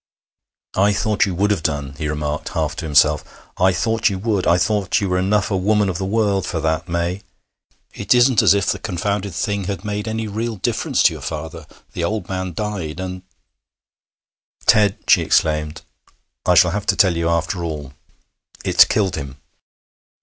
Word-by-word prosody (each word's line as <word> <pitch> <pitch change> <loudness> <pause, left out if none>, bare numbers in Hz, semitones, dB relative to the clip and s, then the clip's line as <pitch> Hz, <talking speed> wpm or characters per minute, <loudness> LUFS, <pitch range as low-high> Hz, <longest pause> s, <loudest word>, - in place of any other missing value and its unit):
'I 100 +2 +3
thought 105 0 +1
you 95 - -3
would 100 +3 +1
have 100 -5 0
done,' 75 -3 -2
he 75 - -2
remarked, 75 0 -3
half 80 -2 -1
to - - -4
himself. 75 0 +3 0.3
'I 95 +1 +4
thought 115 +3 +1
you 95 - -3
would. 100 -1 -1
I 85 - +4
thought 105 +1 +1
you 100 - -1
were 90 0 0
enough 105 +3 +1
a - - +1
woman 105 +2 +2
of 85 - -3
the 95 - -2
world 100 -2 0
for 85 - -2
that, 80 +2 -1
May. 85 +3 -2 0.7
It - - +1
isn't 120 -2 +5
as - - +5
if 100 -2 0
the - - -1
confounded 100 0 -3
thing 100 0 -2
had 100 +1 -5
made 105 +1 -3
any 110 0 -3
real 110 +2 -3
difference 95 - 0
to - - +5
your - - -9
father. 80 0 -6 0.3
The - - -3
old 105 0 -2
man 95 -1 -3
died, 95 -5 -4
and 95 0 -5 0.7
' - - -34
'Ted!' 105 -2 +4
she - - +5
exclaimed, 75 -1 0 0.6
'I 90 - +5
shall 85 +1 +5
have 105 +2 -4
to - - +3
tell 95 -4 +3
you, 85 0 0
after 85 +2 -1
all. 75 -5 -5 0.7
It - - +5
killed 95 -4 +1
him.' 70 -2 -7
95 Hz, 185 wpm, -20 LUFS, 80-105 Hz, 0.7 s, isn't